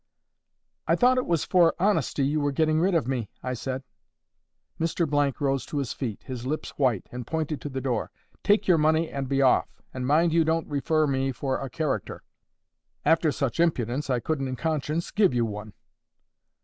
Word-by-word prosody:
'I - - +4
thought 255 +1 +4
it - - -3
was 170 -3 +1
for 175 -3 +4
honesty 165 -7 +1
you 150 +3 +1
were 145 0 +1
getting 155 +2 +2
rid 185 +1 +2
of 155 -7 +1
me,' 125 -6 -2
I 125 - -2
said. 130 +2 -4 1.0
Mr— 145 -5 +1
rose 135 -2 0
to 150 - -4
his 140 -4 -2
feet, 115 -7 -5
his 125 -3 -6
lips 155 +3 -3
white, 125 -9 0
and 125 -1 -6
pointed 160 -2 -2
to 145 - -5
the 135 -1 -4
door. 125 -4 -1 0.3
'Take 205 +1 +2
your 175 -4 +5
money 155 +1 +2
and 135 -2 -4
be 135 0 +2
off. 130 - +4 0.2
And 125 -1 -3
mind 160 +3 +3
you 165 0 +4
don't 160 0 0
refer 155 +2 +1
to 140 - -1
me 135 0 0
for 130 +1 -2
a 135 - -5
character. 135 - -3 0.8
After 160 -1 +4
such 135 -3 -2
impudence 140 -4 0
I 125 -2 +2
couldn't 135 +2 -2
in 130 - -3
conscience 155 +2 -2
give 195 -11 +3
you 120 -1 +2
one. 105 -1 -6
145 Hz, 190 wpm, -26 LUFS, 130-160 Hz, 1.0 s, your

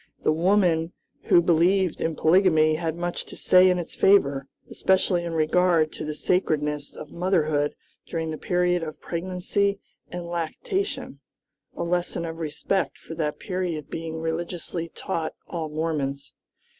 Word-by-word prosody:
The - - +3
women 170 -1 +2 0.3
who 170 - +5
believed 175 +1 +3
in 160 -1 0
polygamy 160 -2 +4
had 160 0 -2
much 175 0 -3
to - - -11
say 185 0 +6
in 180 - +2
its 175 -2 -5
favor, 140 -9 +3 0.2
especially 185 -2 +1
in 170 -1 -4
regard 160 0 +3
to - - -6
the 150 0 -4
sacredness 150 -5 0
of 150 - -9
motherhood 155 -5 +1 0.3
during 160 -1 -3
the 155 - -4
period 180 0 +1
of 155 -2 -6
pregnancy 185 +3 -1 0.3
and 175 -1 -6
lactation; 275 - -3 0.6
a - - -1
lesson 175 0 -1
of 165 0 -5
respect 165 +5 -1
for - - -10
that 155 -2 -2
period 180 -5 -3
being 160 0 -4
religiously 170 +1 -3
taught 160 0 -4
all 165 -3 -4
Mormons. 150 -3 -3
170 Hz, 145 wpm, -25 LUFS, 155-180 Hz, 0.6 s, say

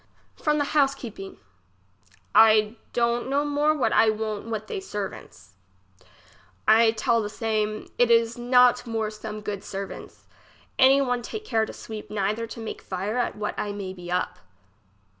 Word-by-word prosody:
From 300 -1 0
the 290 - +1
house^heeping. 270 -9 -1 1.0
I 215 0 +6 0.2
don't 235 +1 0
know 285 +2 +1
more 295 +1 +2
what 225 -6 +1
I 225 - +5
won't 215 0 -3
with 220 -1 -3
they 400 - -4
ser 210 - -4
vants. 95 - -14 1.1
I 225 +1 +6
tell 230 +1 +1
the 210 - -4
same, 215 -1 -2
it 245 -1 +4
is 230 0 +4
not 245 0 +4
more 220 -2 -2
some 215 0 -7
good 205 -2 -5
ser 195 0 -4
vants. - - -12 0.5
Any 270 +2 +6
one 245 -2 0
take 430 - -7
care 220 - +1
to - - -7
sweep 215 -1 -8
neither 210 +2 -1
to 230 - -9
make 225 - -6
fire 195 +6 -3
at 245 - -1
what 210 0 -3
I 205 -1 -2
may 195 -2 -5
be 175 -1 -9
up. 180 0 -1
225 Hz, 165 wpm, -25 LUFS, 210-245 Hz, 1.1 s, I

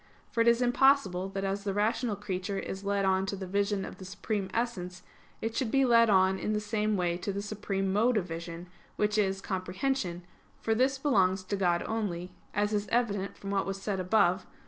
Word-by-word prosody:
For 230 - +1
it 230 - +3
is 235 +1 +5
impossible 245 -7 +3
that 195 0 -4
as 195 +1 -2
the 200 -1 -2
rational 215 +2 +1
creature 195 0 -3
is 195 0 -5
led 200 0 0
on 190 0 +2
to 200 - -2
the 190 -1 -6
vision 200 +1 0
of - - -9
the - - -8
Supreme 195 +1 -3
Essence, 185 -6 -3 0.4
it 225 0 -2
should 250 -2 0
be 270 +3 +3
led 230 -2 +5
on 190 -1 +4
in 215 - -1
the 210 - +1
same 210 0 0
way 175 -1 0
to 190 +3 -3
the 200 - -3
supreme 195 -2 -2
mode 230 +3 +3
of 195 - 0
vision, 170 +1 -7 0.3
which 210 0 +1
is 195 -1 +1
comprehension, 185 0 -2 0.4
for 225 - 0
this 260 +4 +2
belongs 190 -9 +2
to 200 - -2
God 175 -3 +1
only; 185 -5 -3 0.2
as 205 +1 0
is 205 0 0
evident 205 -5 0
from 195 - -6
what 195 -1 0
was 195 0 -3
said 195 -1 -2
above 185 -1 +2
(Q. - - -27
200 Hz, 215 wpm, -30 LUFS, 190-220 Hz, 0.4 s, is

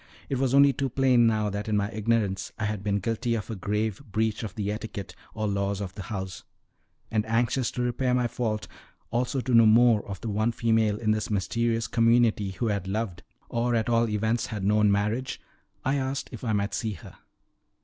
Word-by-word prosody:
It 135 - -1
was 135 0 +2
only 140 0 +7
too 135 +1 -1
plain 125 -2 +4
now 110 -2 +1
that 105 +2 -4
in 105 - +2
my 100 +1 -1
ignorance 105 -3 0
I 110 - -2
had 105 -2 -3
been 100 -1 +1
guilty 115 +4 -1
of 110 +1 -4
a - - -3
grave 105 +3 -2
breach 110 -2 -1
of 110 - -6
the 105 -1 -2
etiquette 105 -2 -6 0.2
or 110 -1 -1
laws 100 0 -1
of 95 -3 -5
the 100 - -7
house; 95 -2 -5 0.7
and 110 -1 +1
anxious 115 +1 +1
to 125 - -1
repair 125 +1 +1
my 125 -1 +2
fault, 115 -3 -2 0.4
also 125 +3 0
to 125 0 -2
know 115 -1 +7
more 115 -1 +5
of 100 - -5
the 115 - -4
one 110 +3 0
female 110 -3 +2
in 110 0 0
this 110 0 -1
mysterious 115 +3 0
community 115 -3 +3
who 95 +5 -2
had 100 -3 -2
loved, 100 -3 -3 0.3
or 120 +1 0
at 115 0 0
all 115 -1 +3
events 110 +2 0
had 105 -4 -5
known 105 +1 +4
marriage, 105 +6 -1 0.5
I 135 +2 +2
asked 135 +1 -2
if 120 -2 -9
I 115 - 0
might 100 0 0
see 110 -3 -2
her. 80 - -12
110 Hz, 205 wpm, -27 LUFS, 105-120 Hz, 0.7 s, only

